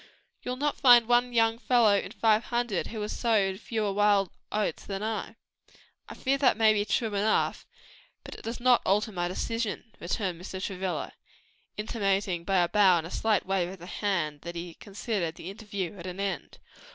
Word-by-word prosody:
You'll 250 Hz, -, -3 dB
not 290 Hz, +2 st, -1 dB
find 245 Hz, -4 st, +7 dB
one 245 Hz, +1 st, +3 dB
young 225 Hz, -1 st, +2 dB
fellow 230 Hz, -3 st, +4 dB
in 200 Hz, -, -1 dB
five 220 Hz, 0 st, +2 dB
hundred 240 Hz, -6 st, -1 dB
who 225 Hz, -, -6 dB
has 210 Hz, -, -4 dB
sowed 200 Hz, -5 st, +1 dB
fewer 215 Hz, -3 st, -2 dB
wild 205 Hz, -2 st, +3 dB, 0.2 s
oats 210 Hz, 0 st, -1 dB
than 195 Hz, 0 st, -5 dB
I." 220 Hz, 0 st, -3 dB, 0.7 s
"I -, -, -8 dB
fear 275 Hz, +1 st, 0 dB
that 265 Hz, -5 st, +4 dB
may 220 Hz, -1 st, +5 dB
be 205 Hz, -1 st, 0 dB
true 215 Hz, +1 st, 0 dB
enough, 205 Hz, +2 st, 0 dB, 0.6 s
but -, -, -9 dB
it -, -, -10 dB
does 230 Hz, +2 st, -5 dB
not 250 Hz, 0 st, +4 dB
alter 210 Hz, +3 st, +1 dB
my 175 Hz, -3 st, -2 dB
decision," 225 Hz, +3 st, -3 dB
returned 180 Hz, -1 st, -3 dB
Mr. 190 Hz, 0 st, -6 dB
Travilla, 190 Hz, -1 st, -3 dB, 0.6 s
intimating 195 Hz, -5 st, -1 dB
by 190 Hz, 0 st, +2 dB
a -, -, +1 dB
bow 190 Hz, -2 st, +5 dB
and 165 Hz, -, -3 dB
a 170 Hz, -, -8 dB
slight 220 Hz, -3 st, +1 dB
wave 185 Hz, -2 st, 0 dB
of 190 Hz, -, -8 dB
the 175 Hz, -, -11 dB
hand, 170 Hz, -7 st, -2 dB
that 170 Hz, 0 st, -7 dB
he 170 Hz, 0 st, -6 dB
considered 195 Hz, -4 st, -4 dB
the 180 Hz, -, -7 dB
interview 200 Hz, -3 st, -5 dB
at 170 Hz, -, -7 dB
an 180 Hz, +1 st, -6 dB
end. 195 Hz, -6 st, -3 dB
205 Hz, 190 wpm, -28 LUFS, 185-225 Hz, 0.7 s, find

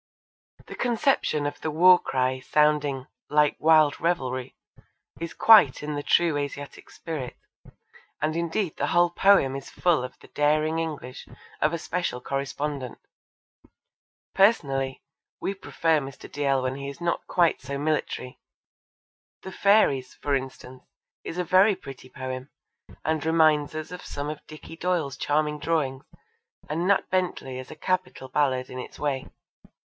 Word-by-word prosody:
The -, -, -9 dB
conception 240 Hz, -, +1 dB
of 145 Hz, -, -4 dB
the 160 Hz, -, -2 dB
war 180 Hz, +4 st, +6 dB
cry 130 Hz, 0 st, -1 dB
sounding 145 Hz, -1 st, +1 dB, 0.2 s
'like 150 Hz, 0 st, +3 dB
wild 155 Hz, -2 st, +5 dB
revelrie' 130 Hz, -7 st, -2 dB, 0.6 s
is 170 Hz, 0 st, -5 dB
quite 210 Hz, -13 st, +6 dB
in 150 Hz, 0 st, -3 dB
the 145 Hz, -, -3 dB
true 165 Hz, 0 st, +2 dB
Asiatic 145 Hz, 0 st, -6 dB
spirit, 150 Hz, -7 st, -6 dB, 0.8 s
and 155 Hz, +1 st, -1 dB
indeed 170 Hz, +1 st, -2 dB
the -, -, -1 dB
whole 175 Hz, 0 st, +3 dB
poem 175 Hz, -8 st, +4 dB
is 135 Hz, 0 st, -7 dB
full 170 Hz, -7 st, +1 dB
of 125 Hz, -, -8 dB
the -, -, -17 dB
daring 155 Hz, +2 st, +1 dB
English 145 Hz, -6 st, -5 dB, 0.3 s
of 150 Hz, -, +3 dB
a -, -, 0 dB
special 170 Hz, -5 st, -3 dB
correspondent. 140 Hz, -1 st, -4 dB, 1.4 s
Personally, 135 Hz, -, +2 dB, 0.4 s
we 195 Hz, -, -2 dB
prefer 165 Hz, -4 st, 0 dB
Mr. 135 Hz, -1 st, -9 dB
Dalziel 140 Hz, -2 st, 0 dB
when 130 Hz, 0 st, -1 dB
he 140 Hz, 0 st, -5 dB
is 140 Hz, +4 st, -10 dB
not 170 Hz, 0 st, -2 dB
quite 170 Hz, -5 st, +2 dB
so 140 Hz, +1 st, -5 dB
military. 145 Hz, -3 st, -2 dB, 1.0 s
The 190 Hz, -, -7 dB
Fairies, 185 Hz, -12 st, +3 dB
for 145 Hz, -, -2 dB
instance, 130 Hz, -1 st, -6 dB, 0.4 s
is 165 Hz, -, -6 dB
a 180 Hz, -, 0 dB
very 190 Hz, +4 st, +4 dB
pretty 130 Hz, -4 st, -11 dB
poem, 130 Hz, 0 st, -6 dB, 0.6 s
and 155 Hz, -2 st, 0 dB
reminds 155 Hz, -2 st, +3 dB
us 155 Hz, +1 st, -5 dB
of 180 Hz, -, -8 dB
some 145 Hz, +1 st, -4 dB
of 150 Hz, -1 st, -7 dB
Dicky 155 Hz, +1 st, -11 dB
Doyle's 165 Hz, -7 st, -1 dB
charming 150 Hz, +1 st, 0 dB
drawings, 145 Hz, -4 st, -1 dB, 0.6 s
and 165 Hz, +4 st, -1 dB
Nat 200 Hz, -1 st, +3 dB
Bentley 175 Hz, -8 st, -1 dB
is 130 Hz, -, -9 dB
a -, -, -9 dB
capital 180 Hz, -4 st, -2 dB
ballad 130 Hz, -2 st, 0 dB
in 130 Hz, -, -7 dB
its -, -, -8 dB
way. 140 Hz, -3 st, -2 dB
150 Hz, 145 wpm, -26 LUFS, 135-170 Hz, 1.4 s, war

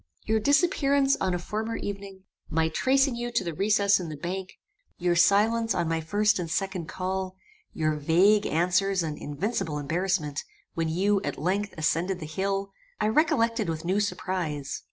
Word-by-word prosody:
Your 220 Hz, 0 st, +2 dB
disappearance 280 Hz, -, +3 dB
on 185 Hz, -2 st, +1 dB
a -, -, 0 dB
former 220 Hz, +5 st, -3 dB
evening, 195 Hz, -1 st, -6 dB, 0.3 s
my 160 Hz, 0 st, +1 dB
tracing 270 Hz, -, +2 dB
you 240 Hz, 0 st, -4 dB
to -, -, +1 dB
the 170 Hz, -2 st, -4 dB
recess 200 Hz, +3 st, +3 dB
in 175 Hz, -3 st, -5 dB
the 155 Hz, -, -6 dB
bank, 185 Hz, +4 st, -5 dB, 0.4 s
your 175 Hz, -1 st, +1 dB
silence 215 Hz, +6 st, +3 dB
on 175 Hz, -2 st, 0 dB
my 165 Hz, 0 st, 0 dB
first 205 Hz, +5 st, +2 dB
and 170 Hz, -2 st, -3 dB
second 185 Hz, 0 st, -2 dB
call, 185 Hz, +3 st, -3 dB, 0.4 s
your 155 Hz, -1 st, 0 dB
vague 180 Hz, +8 st, +3 dB
answers 180 Hz, +3 st, +1 dB
and 155 Hz, -2 st, -3 dB
invincible 155 Hz, +1 st, -3 dB
embarrassment, 160 Hz, 0 st, -1 dB, 0.3 s
when 165 Hz, -1 st, -1 dB
you, 195 Hz, +4 st, +1 dB
at -, -, -3 dB
length, 195 Hz, +7 st, -1 dB
ascended 170 Hz, +4 st, 0 dB
the 155 Hz, -, -6 dB
hill, 195 Hz, +5 st, -2 dB, 0.3 s
I 215 Hz, -, +2 dB
recollected 230 Hz, -, +2 dB
with 160 Hz, 0 st, -4 dB
new 190 Hz, +4 st, +1 dB
surprize. 175 Hz, -8 st, -2 dB
190 Hz, 165 wpm, -27 LUFS, 165-210 Hz, 0.4 s, disappearance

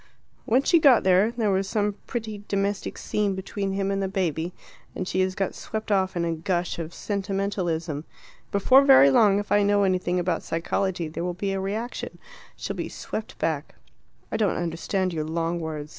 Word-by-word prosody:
"When 255 Hz, +4 st, +3 dB
she 335 Hz, -, +4 dB
got 275 Hz, -6 st, +6 dB
there, 190 Hz, +3 st, +4 dB
there 230 Hz, -3 st, 0 dB
was 190 Hz, 0 st, 0 dB
some 210 Hz, -1 st, 0 dB
pretty 215 Hz, -3 st, -5 dB
domestic 200 Hz, 0 st, -1 dB
scene 205 Hz, -2 st, -1 dB
between 195 Hz, +1 st, -3 dB
him 195 Hz, 0 st, -1 dB
and 195 Hz, 0 st, -1 dB
the 195 Hz, -, 0 dB
baby, 175 Hz, -3 st, -1 dB, 0.4 s
and 185 Hz, -, -3 dB
she 185 Hz, -, -1 dB
has 185 Hz, 0 st, +1 dB
got 195 Hz, -1 st, -1 dB
swept 220 Hz, 0 st, -5 dB
off 190 Hz, -2 st, +2 dB
in 170 Hz, -, 0 dB
a 165 Hz, -, 0 dB
gush 175 Hz, +2 st, -2 dB
of 165 Hz, 0 st, -5 dB
sentimentalism. 190 Hz, -6 st, -2 dB, 0.5 s
Before 255 Hz, +7 st, +5 dB
very 265 Hz, -, +7 dB
long, 200 Hz, +6 st, +5 dB
if 205 Hz, 0 st, -4 dB
I 205 Hz, -, +5 dB
know 205 Hz, 0 st, +3 dB
anything 180 Hz, -1 st, +1 dB
about 175 Hz, -1 st, 0 dB
psychology, 175 Hz, +1 st, -1 dB
there 160 Hz, +2 st, -5 dB
will 180 Hz, 0 st, -2 dB
be 195 Hz, +2 st, -2 dB
a 195 Hz, -, -1 dB
reaction. 215 Hz, +5 st, -4 dB, 0.4 s
She'll -, -, -5 dB
be -, -, -4 dB
swept 215 Hz, -, -6 dB
back." 155 Hz, -2 st, -2 dB, 0.6 s
"I -, -, 0 dB
don't 210 Hz, -4 st, +1 dB
understand 175 Hz, +2 st, -1 dB
your 155 Hz, -2 st, -2 dB
long 165 Hz, +2 st, -1 dB
words. 155 Hz, -2 st, -5 dB
190 Hz, 190 wpm, -25 LUFS, 170-205 Hz, 0.6 s, very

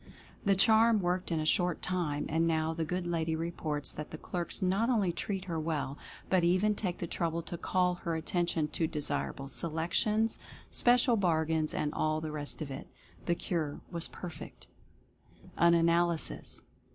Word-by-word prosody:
The 195 Hz, -2 st, +4 dB
charm 220 Hz, +2 st, +5 dB
worked 180 Hz, 0 st, -1 dB
in 165 Hz, -, +1 dB
a 155 Hz, -, -1 dB
short 175 Hz, +2 st, +2 dB
time, 165 Hz, -5 st, -1 dB
and 165 Hz, +2 st, +1 dB
now 160 Hz, 0 st, +1 dB
the 165 Hz, 0 st, -2 dB
good 180 Hz, +2 st, -2 dB
lady 165 Hz, -2 st, 0 dB
reports 160 Hz, -3 st, -3 dB
that 150 Hz, -, -6 dB
the 155 Hz, -, -7 dB
clerks 175 Hz, +2 st, -3 dB
not 195 Hz, +6 st, +1 dB
only 210 Hz, -8 st, +2 dB
treat 190 Hz, +2 st, -3 dB
her 170 Hz, -3 st, -2 dB
well 155 Hz, -3 st, -2 dB, 0.3 s
but 185 Hz, -2 st, +3 dB
even 185 Hz, +5 st, +3 dB
take 190 Hz, -4 st, -2 dB
the -, -, -3 dB
trouble 170 Hz, 0 st, -2 dB
to 170 Hz, -, -5 dB
call 180 Hz, +1 st, +1 dB
her 165 Hz, -1 st, -1 dB
at 160 Hz, -, -4 dB
tention 170 Hz, -3 st, 0 dB
to 160 Hz, +1 st, 0 dB
desirable 145 Hz, -2 st, -2 dB
selections, 170 Hz, +9 st, 0 dB, 0.3 s
special 245 Hz, -1 st, +4 dB
bargains, 160 Hz, -4 st, +1 dB
and 150 Hz, 0 st, -1 dB
all 155 Hz, 0 st, +1 dB
the 155 Hz, -1 st, -4 dB
rest 150 Hz, +1 st, -1 dB
of 140 Hz, -, -7 dB
it. 135 Hz, -, -7 dB, 0.4 s
The 170 Hz, -, +3 dB
cure 160 Hz, -5 st, -3 dB
was 170 Hz, -2 st, 0 dB
perfect. 175 Hz, -4 st, -9 dB, 0.9 s
AN 170 Hz, 0 st, +5 dB
ANALYSIS. 170 Hz, 0 st, +1 dB
170 Hz, 170 wpm, -31 LUFS, 160-185 Hz, 0.9 s, charm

